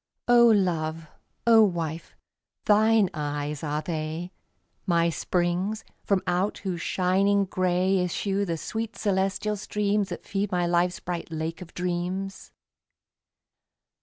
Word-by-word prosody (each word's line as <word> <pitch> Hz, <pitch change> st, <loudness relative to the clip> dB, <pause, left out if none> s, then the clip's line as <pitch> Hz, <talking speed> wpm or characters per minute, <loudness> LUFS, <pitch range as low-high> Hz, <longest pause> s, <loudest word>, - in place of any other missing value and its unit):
O 240 Hz, -1 st, +7 dB
Love, 165 Hz, -7 st, +1 dB, 0.4 s
O 225 Hz, -1 st, +7 dB
Wife, 170 Hz, -4 st, -2 dB, 0.5 s
thine 215 Hz, 0 st, +4 dB
eyes 145 Hz, -1 st, -3 dB
are 150 Hz, 0 st, -2 dB
they, 160 Hz, +2 st, -4 dB, 0.6 s
My 170 Hz, -1 st, +3 dB
springs 180 Hz, +6 st, -1 dB, 0.2 s
from 195 Hz, -2 st, +1 dB
out 180 Hz, +3 st, 0 dB
whose 185 Hz, -4 st, -4 dB
shining 195 Hz, +3 st, +2 dB
gray 185 Hz, +1 st, +1 dB
Issue 195 Hz, +3 st, -1 dB
the 170 Hz, -4 st, -2 dB
sweet 225 Hz, +6 st, -4 dB
celestial 195 Hz, +1 st, 0 dB
streams 205 Hz, 0 st, 0 dB
That -, -, -7 dB
feed 200 Hz, 0 st, -2 dB
my 180 Hz, -1 st, +1 dB
life's 175 Hz, +1 st, +1 dB
bright 175 Hz, -1 st, -5 dB
Lake 160 Hz, +1 st, -4 dB
of 175 Hz, -2 st, -11 dB
Dreams. 180 Hz, +2 st, -3 dB
180 Hz, 120 wpm, -26 LUFS, 170-200 Hz, 0.6 s, O